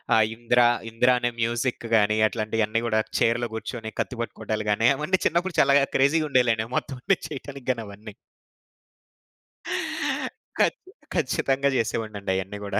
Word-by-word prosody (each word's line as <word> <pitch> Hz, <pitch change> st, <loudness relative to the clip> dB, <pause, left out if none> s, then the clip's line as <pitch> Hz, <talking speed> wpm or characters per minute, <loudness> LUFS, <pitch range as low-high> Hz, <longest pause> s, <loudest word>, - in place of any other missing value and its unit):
ఆ! -, -, +5 dB, 0.2 s
'ఇంద్ర'. 120 Hz, +1 st, +3 dB, 0.2 s
'ఇంద్ర' 125 Hz, +2 st, +3 dB
అనే 120 Hz, 0 st, 0 dB
మ్యూజిక్ 120 Hz, +1 st, -1 dB
గానీ, 105 Hz, 0 st, +3 dB
అట్లాంటియన్నీ 110 Hz, 0 st, -1 dB
గూడా, 110 Hz, -1 st, +2 dB, 0.2 s
చెయిర్‌లో 120 Hz, +1 st, +1 dB
గూర్చొని 110 Hz, 0 st, -5 dB
కత్తి 125 Hz, -, -5 dB
పట్టుకోటాలు 110 Hz, -2 st, -4 dB
గానీ, 115 Hz, +3 st, +3 dB
అవన్నీ 165 Hz, +5 st, 0 dB
చిన్నప్పుడు 170 Hz, +2 st, +1 dB
చాలాగా 140 Hz, 0 st, +5 dB
క్రేజీ‌గుండేయిలేండి 135 Hz, -6 st, +3 dB
ఆ -, -, -18 dB
మొత్తవన్ని 135 Hz, +8 st, 0 dB
చేయటానికి 140 Hz, -2 st, -8 dB
గానీ 115 Hz, -3 st, -4 dB
అవన్నీ. 100 Hz, +1 st, -11 dB, 2.5 s
ఖచ్ -, -, +2 dB, 0.4 s
ఖచ్చితంగా 140 Hz, -3 st, +1 dB
జెసేవాడినండయన్నీ 105 Hz, -4 st, -2 dB
గూడా. 100 Hz, -, -1 dB
120 Hz, 120 wpm, -25 LUFS, 110-135 Hz, 2.5 s, ఆ